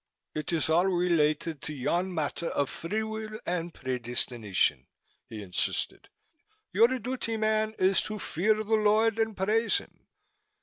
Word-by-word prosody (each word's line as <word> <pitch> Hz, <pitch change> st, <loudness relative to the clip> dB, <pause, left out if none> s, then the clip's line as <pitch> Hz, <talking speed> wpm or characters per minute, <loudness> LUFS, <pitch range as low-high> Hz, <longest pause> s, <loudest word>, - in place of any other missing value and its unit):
"It 155 Hz, +2 st, -2 dB
is 165 Hz, -2 st, +2 dB
all 170 Hz, +4 st, +3 dB
related 165 Hz, -4 st, +1 dB
to 150 Hz, -, -5 dB
yon 175 Hz, +7 st, -1 dB
matter 160 Hz, 0 st, -2 dB
of 140 Hz, -4 st, -1 dB
free 210 Hz, +6 st, -3 dB
will 220 Hz, 0 st, -5 dB
and 175 Hz, -1 st, -2 dB
predestination," 120 Hz, -, 0 dB, 0.4 s
he 110 Hz, -2 st, -7 dB
insisted. 90 Hz, -2 st, -3 dB, 0.6 s
"Your 220 Hz, +5 st, +6 dB
duty, 250 Hz, -2 st, -3 dB
man, 215 Hz, 0 st, +1 dB
is 190 Hz, +1 st, +3 dB
to 215 Hz, -, -4 dB
fear 205 Hz, +2 st, +1 dB
the 215 Hz, -, -3 dB
Lord 220 Hz, +1 st, +3 dB
and 220 Hz, -1 st, 0 dB
praise 215 Hz, +4 st, +2 dB
Him. -, -, -12 dB
185 Hz, 140 wpm, -28 LUFS, 150-220 Hz, 0.6 s, Your